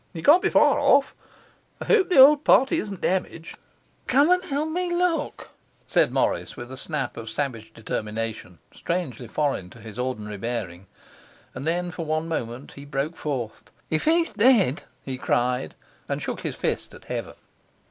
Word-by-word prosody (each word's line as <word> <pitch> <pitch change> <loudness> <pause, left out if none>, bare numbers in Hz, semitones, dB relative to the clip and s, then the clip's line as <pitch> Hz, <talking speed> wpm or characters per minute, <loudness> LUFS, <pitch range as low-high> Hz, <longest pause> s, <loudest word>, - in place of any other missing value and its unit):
He 165 - -7
can't 330 +5 +7
be 415 - +2
far 295 -1 +4
off. 280 -1 +4 0.7
I - - -6
hope 390 -5 +3
the 360 - +2
old 285 +3 +8
party 270 +5 +4
isn't 200 -3 -6
damaged.' 175 -3 -2 0.5
'Come 285 +6 +4
and 365 0 +3
help 300 -1 -2
me 355 +2 -1
to 345 - -1
look,' 345 -4 -1 0.3
said - - +2
Morris, - - -1
with 120 +1 -8
a - - -6
snap 135 -1 -4
of 115 -1 -6
savage 115 -6 -4
determination 110 -3 -5 0.2
strangely 140 -9 -3
foreign 135 -7 -1
to 115 - -15
his 110 0 -10
ordinary 110 -5 -3
bearing; 95 -5 -5 0.7
and 140 - -7
then, 175 +1 -1
for 170 - -5
one 155 +1 -1
moment, 125 -4 -4
he 140 - -11
broke 145 +3 -3
forth. 130 -9 -5 0.2
'If 155 - 0
he's 330 +1 +2
dead!' 210 - +3 0.2
he 130 -1 -5
cried, 125 -11 0 0.3
and - - -1
shook - - -4
his - - -4
fist - - -3
at - - -15
heaven. - - -5
155 Hz, 170 wpm, -25 LUFS, -, 0.7 s, old